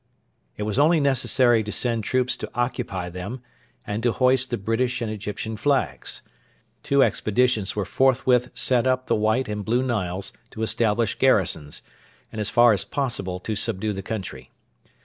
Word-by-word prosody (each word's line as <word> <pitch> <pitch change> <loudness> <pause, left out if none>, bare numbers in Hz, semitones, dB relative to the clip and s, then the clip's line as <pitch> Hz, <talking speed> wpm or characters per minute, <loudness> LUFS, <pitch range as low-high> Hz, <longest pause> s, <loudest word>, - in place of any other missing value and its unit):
It 105 - -3
was 105 +4 -1
only 160 +3 +4
necessary 130 -4 +3
to 105 - -5
send 115 -2 -1
troops 125 +3 0
to - - -6
occupy 120 -7 -2
them 100 +8 -7 0.4
and 105 +1 -3
to 120 0 +2
hoist 130 0 +3
the 120 - -1
British 120 +4 -1
and 115 -2 -3
Egyptian 105 +1 -5
flags. 105 - -1 0.6
Two 140 -1 +3
expeditions 110 -2 +1
were 105 -2 -1
forthwith 125 +1 +2
sent 125 -1 +1
up 130 0 +1
the - - +1
White 110 +4 +1
and 105 -1 -4
Blue 120 +5 +1
Niles 100 -6 -2 0.2
to 110 - -6
establish 110 -1 +1
garrisons, 75 -2 +1 0.5
and 110 - -5
as 105 - 0
far 120 -1 +5
as 100 -1 +1
possible 100 -7 -2
to 110 +3 -3
subdue 105 +1 0
the 95 - -5
country. 100 -1 -6
115 Hz, 165 wpm, -24 LUFS, 105-125 Hz, 0.6 s, far